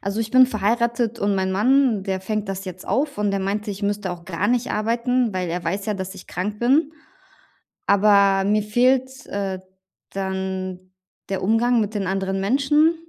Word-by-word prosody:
also 200 +2 -2
ich 220 -1 -3
bin 255 0 +7
verheiratet 235 +1 0
und 200 0 +1
mein 190 -1 0
Mann, 240 +1 +3
der 190 -1 -2
fängt 210 +1 -3
das 195 0 -4
jetzt 185 -1 -8
auf 280 -4 0
und 205 -1 +1
der 195 - -1
meinte, 205 +2 -2
ich 200 +1 -7
müsste 205 -1 -1
auch 170 -1 -10
gar 185 +3 -2
nicht 245 +1 0
arbeiten, 235 +2 0
weil 180 -1 -2
er 175 +1 -3
weiß 195 +5 -3
ja, 210 - 0
dass 190 0 -5
ich 190 - -12
krank 205 +4 -4
bin. 280 +6 +2 0.9
Aber 200 -1 +4
mir 210 0 +2
fehlt, 260 +4 +1
äh, 195 -2 -3 0.5
dann 190 -1 -4 0.4
der 195 -1 -3
Umgang 230 +3 +2
mit 210 +1 -2
den 200 -3 -2
anderen 195 0 -1
Menschen. 280 +9 +3
205 Hz, 185 wpm, -22 LUFS, 190-235 Hz, 0.9 s, bin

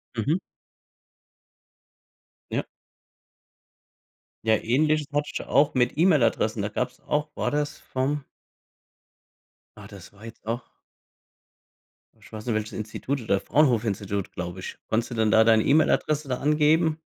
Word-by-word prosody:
Mhm. 145 - 0 2.1
Ja. - - -1 1.8
Ja, 110 -1 +5
ähnliches 150 +6 +1
hatte 145 0 0
ich - - -3
auch 145 +1 +3
mit 125 +1 +1
E-Mail-Adressen. 125 - +3
Da 105 - -1
gab's 125 +4 -3
auch 150 +1 0
war - - -1
das 150 0 -2
vom 135 +2 -2 1.5
Ah, 105 -1 -11
das 100 -4 -12
war 100 +2 -17
jetzt 115 -1 -12
auch 115 +3 -2 1.6
ich - - -18
weiß 110 -1 -8
nicht, 120 - 0
welches 110 0 -3
Institut 125 +5 -4
oder 100 -3 +1
Fraunhofer-Institut, 105 -8 +1
glaube 90 0 -6
ich. 95 - -7
Konntest 115 +2 -1
du - - -4
dann 110 -1 +2
da 110 0 +6
deine 110 -1 +4
E-Mail-Adresse 155 0 +2
da 125 -2 -1
angeben 155 +2 +3
120 Hz, 130 wpm, -25 LUFS, 110-150 Hz, 2.1 s, da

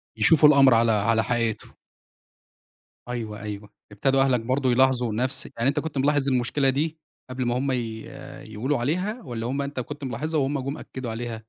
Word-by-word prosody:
يشوفوا 150 +7 +5
الأمر 135 -3 +6
على 115 0 +4
على 110 +1 +2
حقيقته. 115 -3 -2 1.3
أيوه، 110 -4 -5
أيوه، 105 -1 -7 0.2
ابتدوا 135 +6 +1
أهلك 130 -3 +2
برضه 130 +2 0
يلاحظوا 125 -3 +2
نفْس 125 +4 0
يعني 120 +4 +2
أنت 145 +1 0
كنت 150 -2 -5
ملاحظ 145 0 +2
المشكلة 135 +2 +1
دي 155 +4 -1 0.3
قبل 130 -1 -3
ما 120 +1 0
هُم 135 +1 -1
ي 115 -3 -3 0.5
يقولوا 130 +7 -1
عليها 185 - -2
والّا 120 -4 -5
هُم 140 +2 -2
أنت 140 -1 -4
كنت 145 +3 -7
ملاحظها 145 +5 -2
وهُم 140 +1 0
جُم 140 +4 -4
أكّدوا 125 -3 -7
عليها؟ 115 -1 -5
130 Hz, 170 wpm, -24 LUFS, 115-140 Hz, 1.3 s, الأمر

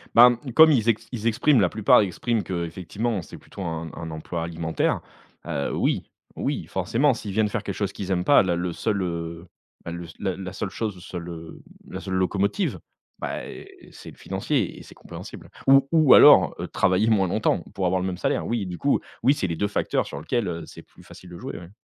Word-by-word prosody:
Ben, 120 0 +8 0.2
comme 160 0 +8
ils 120 -6 +2
ex 115 -2 0
ils 115 -3 -3
expriment, 120 +3 +3
la 95 - +4
plupart, 105 +3 +4
expriment 110 +3 0
que 90 -2 -3
effectivement 95 +6 -3
c'est - - -11
plutôt 100 - -10
un 80 -2 -4
un 80 -1 -7
emploi 80 +2 -5
alimentaire, 80 -1 -1 0.4
heu, 70 - -2
oui, - - 0 0.3
oui, - - -2
forcément, 135 +4 +1
s'ils 105 -4 -6
viennent 110 +1 +2
faire - - -3
quelque 100 - -4
chose 100 -2 -2
qu'ils 100 -1 -6
aiment 90 -1 +1
pas, 145 - +6
là, 90 -3 0
le 90 +1 -2
seul, 100 +3 -1
heu, 85 -1 -4 0.4
ben, 85 - -6
le 85 0 -6
s 80 - -12
la 95 -2 -2
la 95 -1 -6
seule - - -3
chose 110 -4 -4
où 90 - -13
ça 90 - -7
le 85 - -6
la 85 -2 -7
seule, 80 - -11
heu, - - -19 0.3
la - - -3
seule 95 - -6
locomotive, 100 - 0 0.4
bah, - - -4
eh, 390 -2 -12
c'est - - -11
le - - -14
financier - - -2
et - - -11
c'est - - -15
compréhensible - - -10 0.2
ou 135 0 +7
ou 155 -5 +6
alors, - - +8
heu, - - -4
travailler 95 +5 +2
moins 100 -4 +3
longtemps, 110 +5 +1
pour 95 - -2
avoir 90 +1 +1
le 90 - -2
même 90 -1 -3
salaire, - - -1
oui, 115 -4 -1
du 90 -1 -6
coup, 140 +7 +1 0.2
oui, 135 - +5
c'est 100 - -2
les 85 -2 -3
2 105 - 0
facteurs 105 - -1
sur 70 - -7
lequel, 105 +8 -1
heu, 85 -1 -4
c'est - - -12
plus - - -20
facile 90 - -14
de 85 - -9
jouer, - - -7
ouais. 85 - -12
95 Hz, 235 wpm, -24 LUFS, 85-110 Hz, 0.4 s, Ben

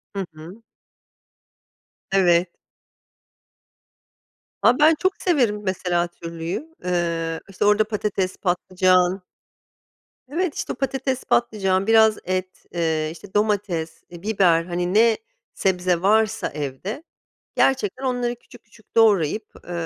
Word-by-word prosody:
Hı 195 - -2
hı. 170 +8 -12 1.5
Evet. 175 -2 +3 2.1
A, 250 +4 +4
ben 310 +1 +6
çok 375 0 +2
severim 245 - +1
mesela 180 -2 0
türlüyü. 170 - -6
Eee, 170 -2 -1
işte, 195 +1 -2
orada 210 +1 +5
patates, 205 -3 -2
patlıcan 185 0 +2 1.1
Evet, 335 +2 -1
işte, - - -3
patates, 265 0 -2
patlıcan, 195 -4 +1
biraz 220 -1 +5
et, 185 0 -4
eee, 160 -2 0
işte, 190 +4 -14
domates, 205 -6 -1
eee, 175 0 -11
biber, 190 -6 +3
hani, 175 +2 -2
ne 225 0 +4 0.4
sebze 180 -2 +1
varsa 220 +2 +2
evde, 150 - -5 0.5
gerçekten 260 -1 +1
onları 245 -1 -1
küçük 245 0 -18
küçük 215 0 -23
doğrayıp, 210 -2 +3 0.2
eee, - - -5
195 Hz, 110 wpm, -22 LUFS, 175-225 Hz, 2.1 s, ben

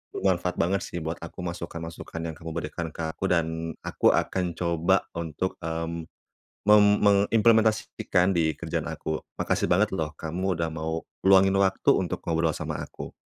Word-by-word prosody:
bermanfaat 90 -2 0
banget 95 +3 +1
sih - - -6
buat 80 +1 -3
aku, 90 - -8
masukan-masukan 85 -1 -6
yang - - -11
kamu 80 0 -7
berikan 80 +1 -4
ke 80 - -4
aku 95 - -3
dan, 80 -1 0
aku - - +3
akan 90 -2 0
coba 85 -1 +2
untuk, 85 +2 -3
mmm, 80 0 -4 0.6
mem 105 0 +8 0.2
mengimplementasikan 105 -2 +3
di 80 -2 +2
kerjaan - - -3
aku. 80 0 -3 0.2
Makasih - - +1
banget 100 +3 +3
loh, 80 -1 -2
kamu 90 +4 -2
udah 80 -1 0
mau 80 +1 -3 0.2
luangin 95 0 +6
waktu, 95 -1 +2
untuk 90 -2 -1
ngobrol 80 -1 +1
sama - - -4
aku. - - -9
85 Hz, 155 wpm, -26 LUFS, 80-95 Hz, 0.6 s, mem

